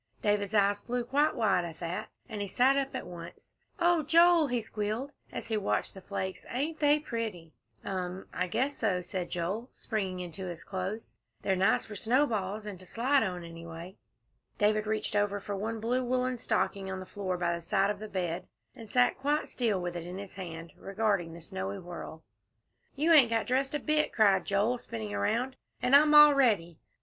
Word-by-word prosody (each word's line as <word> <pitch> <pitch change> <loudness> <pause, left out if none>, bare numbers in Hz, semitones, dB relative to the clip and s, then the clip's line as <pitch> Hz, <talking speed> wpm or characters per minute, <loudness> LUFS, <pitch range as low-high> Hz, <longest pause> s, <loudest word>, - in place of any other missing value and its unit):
David's 205 0 +1
eyes 200 0 +3
flew 245 0 -2
quite 290 +5 +2
wide 205 -7 +2
at 165 -2 -7
that, 170 +1 -4 0.2
and 215 -4 -5
he 200 - -2
sat 255 +7 +4
up 275 -1 -1
at - - -4
once. 170 -1 -10 0.2
"Oh, 345 -1 +3
Joel," 335 +1 +5
he 245 -2 0
squealed, 220 +5 -3 0.2
as - - -5
he 220 - -1
watched 205 - -1
the 190 - -10
flakes, 190 0 -4
"ain't 300 +6 -2
they 295 0 +5
pretty!" 215 - -5 0.3
"Um! 185 0 -4
I 180 - -1
guess 260 +10 0
so," 190 -5 0
said 180 0 -4
Joel, 195 +8 -3
springing 195 -5 -3
into 180 +1 -6
his 170 -1 -7
clothes; 195 +3 -5 0.3
"they're 190 - +2
nice 190 +3 +3
for 210 - -8
snowballs 215 -3 0
and 200 -4 -6
to 185 - -11
slide 265 +4 +2
on, 180 -2 -2
anyway." 165 +2 -9 0.6
David 215 +1 +2
reached 215 -1 -1
over 205 0 +1
for 200 0 -5
one 220 +3 -3
blue 245 +4 0
woollen 255 0 0
stocking 200 -3 -1
on 190 0 -4
the 185 - -7
floor 185 -2 -3
by 170 -1 0
the 170 - -4
side 195 +4 +2
of 205 - -6
the 215 0 -7
bed, 180 -2 -3 0.3
and 225 -4 -11
sat 245 +2 +3
quite 290 +3 0
still 225 -6 0
with 175 -1 -4
it 170 0 -5
in 180 +1 -6
his 200 -1 -8
hand, 165 -3 -7
regarding 195 -4 0
the 170 - -10
snowy 100 -10 -4
whirl. 170 -2 -8 0.7
"You 320 +4 +3
ain't 275 -7 +7
got 225 -1 +1
dressed 265 +3 0
a - - 0
bit," 305 +2 +1
cried 200 -4 +4
Joel, 210 +5 +1
spinning 110 - -6
around, 235 - 0 0.2
"and 250 +2 +4
I'm 300 +1 +6
all 295 0 +10
ready." 205 - +2
205 Hz, 195 wpm, -30 LUFS, 180-250 Hz, 0.7 s, all